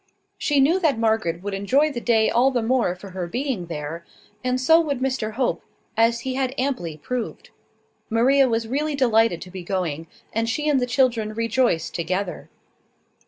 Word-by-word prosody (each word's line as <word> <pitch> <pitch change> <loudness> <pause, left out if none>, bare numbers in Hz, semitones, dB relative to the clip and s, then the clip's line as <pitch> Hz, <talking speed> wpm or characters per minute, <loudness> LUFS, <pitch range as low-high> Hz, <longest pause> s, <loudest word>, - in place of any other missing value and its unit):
She 290 -2 +2
knew 315 +8 +4
that 315 -9 +2
Margaret 220 -7 0
would 205 0 -4
enjoy 265 +11 +2
the 240 -4 -5
day 225 -2 +3
all 250 +3 +3
the 245 -3 -1
more 230 -6 +1
for 190 +1 -11
her 180 -1 -4
being 240 -4 -3
there; 160 +1 -5 0.4
and 255 0 0
so 320 +6 +5
would 285 -5 -2
Mr 255 -5 -1
Hope, 255 +3 -1 0.3
as 230 +1 +3
he 260 +1 -3
had 260 0 -1
amply 245 - -2
proved. 245 +9 -5 0.6
Maria 260 +4 +4
was 225 -1 -1
really 290 +5 -1
delighted 225 -9 +2
to 180 - -12
be 190 0 -7
going, 170 -4 -3 0.3
and 225 +1 0
she 300 +6 -1
and 290 -3 +3
the 250 - -1
children 235 -5 +1
rejoiced 230 -6 +1
together. 185 +2 -3
230 Hz, 175 wpm, -23 LUFS, 195-265 Hz, 0.6 s, so